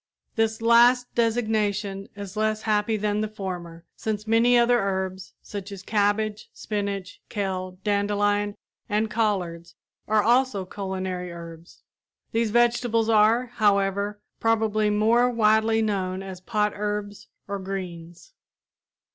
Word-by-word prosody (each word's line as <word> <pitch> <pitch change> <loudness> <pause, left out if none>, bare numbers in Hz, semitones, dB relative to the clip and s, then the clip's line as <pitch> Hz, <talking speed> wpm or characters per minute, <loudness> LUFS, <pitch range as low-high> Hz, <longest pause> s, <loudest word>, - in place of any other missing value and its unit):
This 225 0 0
last 240 +2 +5
designation 215 -4 0
is 200 -1 -8
less 215 0 0
happy 215 0 +1
than 210 0 0
the 215 - -1
former, 180 -5 -7
since 215 -1 -3
many 230 +2 +4
other 240 0 +4
herbs, 190 -1 -3
such 200 -1 -7
as 195 -1 -8
cabbage, 210 +1 0
spinach, 200 -3 -4
kale, 185 -3 -3
dandelion 205 0 +1 0.3
and 215 +1 0
collards, 180 -7 -1 0.3
are 215 -1 +3
also 240 -4 +2
culinary 185 -2 -4
herbs. 170 0 -11 0.5
These 230 0 +1
vegetables 235 0 +2
are, 225 +3 +4
however, 200 0 +1 0.2
probably 220 -2 +2
more 225 +4 +3
widely 220 -1 +3
known 190 -3 -2
as 190 -2 -8
potherbs 210 -1 -2 0.2
or 200 0 -3
greens. 180 - -7
210 Hz, 115 wpm, -25 LUFS, 195-220 Hz, 0.5 s, last